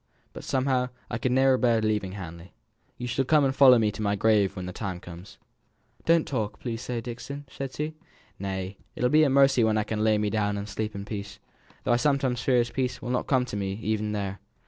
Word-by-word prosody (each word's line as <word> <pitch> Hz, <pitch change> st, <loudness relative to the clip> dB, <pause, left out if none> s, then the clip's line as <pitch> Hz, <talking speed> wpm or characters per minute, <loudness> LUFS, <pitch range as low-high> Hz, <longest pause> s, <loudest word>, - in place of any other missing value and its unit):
But -, -, -9 dB
somehow 130 Hz, -1 st, +1 dB, 0.2 s
I -, -, -2 dB
could 130 Hz, -, 0 dB
ne'er 130 Hz, 0 st, +4 dB
bear 120 Hz, -3 st, +3 dB
leaving 105 Hz, -3 st, -1 dB
Hamley. 85 Hz, -2 st, -9 dB, 0.4 s
You 125 Hz, -, -5 dB
shall 125 Hz, +3 st, 0 dB
come 150 Hz, +1 st, +4 dB
and 135 Hz, 0 st, 0 dB
follow 130 Hz, -3 st, +8 dB
me 110 Hz, -2 st, +2 dB
to 110 Hz, -, -7 dB
my 100 Hz, -1 st, +1 dB
grave 100 Hz, -2 st, +3 dB
when 90 Hz, -2 st, -5 dB
my 90 Hz, -, -5 dB
time 95 Hz, -2 st, -5 dB
comes." 90 Hz, +2 st, -11 dB, 0.7 s
"Don't 165 Hz, -1 st, +4 dB
talk 110 Hz, -6 st, -2 dB
so, -, -, -31 dB
please, 115 Hz, -1 st, -4 dB, 0.2 s
Dixon," 140 Hz, +4 st, -7 dB
said 135 Hz, 0 st, -6 dB
she. 150 Hz, +1 st, -3 dB, 0.5 s
"Nay, 95 Hz, 0 st, -4 dB, 0.2 s
it'll 125 Hz, +1 st, +1 dB
be 155 Hz, +1 st, +6 dB
a 145 Hz, -, +4 dB
mercy 135 Hz, -2 st, +5 dB
when 110 Hz, -1 st, +2 dB
I 105 Hz, -, +2 dB
can 110 Hz, 0 st, -2 dB
lay 110 Hz, -1 st, +4 dB
me 105 Hz, -1 st, 0 dB
down 105 Hz, -2 st, 0 dB
and 100 Hz, +1 st, -5 dB
sleep 105 Hz, +1 st, -4 dB
in 100 Hz, 0 st, -5 dB
peace: 105 Hz, -1 st, -6 dB, 0.5 s
though -, -, +2 dB
I -, -, +4 dB
sometimes 130 Hz, -2 st, +1 dB
fear 125 Hz, -2 st, +3 dB
as 120 Hz, -, -3 dB
peace 125 Hz, -2 st, -2 dB
will 125 Hz, -, -5 dB
not 125 Hz, -, -1 dB
come 130 Hz, -2 st, +2 dB
to 120 Hz, -, -6 dB
me 100 Hz, -1 st, -2 dB
even 105 Hz, 0 st, -2 dB
there." 100 Hz, -2 st, -3 dB
110 Hz, 230 wpm, -27 LUFS, 100-130 Hz, 0.7 s, follow